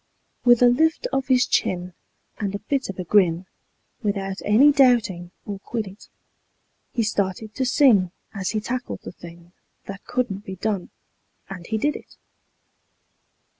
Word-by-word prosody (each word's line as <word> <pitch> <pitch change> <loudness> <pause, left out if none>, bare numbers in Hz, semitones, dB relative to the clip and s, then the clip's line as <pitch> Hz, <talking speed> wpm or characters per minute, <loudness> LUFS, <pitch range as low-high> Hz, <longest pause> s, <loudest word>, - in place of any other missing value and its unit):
With 240 0 +6
a - - +8
lift 315 +6 +2
of 270 -1 0
his 255 -2 +4
chin 180 -4 -1 0.5
and 200 -1 -2
a 200 - -7
bit 275 -5 -1
of 195 - -6
a 185 - -3
grin, 180 -2 +3 0.6
Without 195 -3 -2
any 250 +8 +6
doubting 235 - +3 0.2
or 200 -2 -5
quiddit, 210 -2 -6 0.8
He 230 - 0
started 210 0 -2
to 260 - -1
sing 245 -8 +4 0.2
as 195 -3 -3
he 215 - -1
tackled 245 +4 -4
the - - -7
thing 170 0 -13 0.3
That 195 0 -8
couldn't 230 -6 -2
be 190 - -7
done, 200 -1 -2 0.6
and 180 -3 -8
he 220 - -1
did 295 +7 0
it. - - -12
210 Hz, 150 wpm, -23 LUFS, 190-245 Hz, 0.8 s, a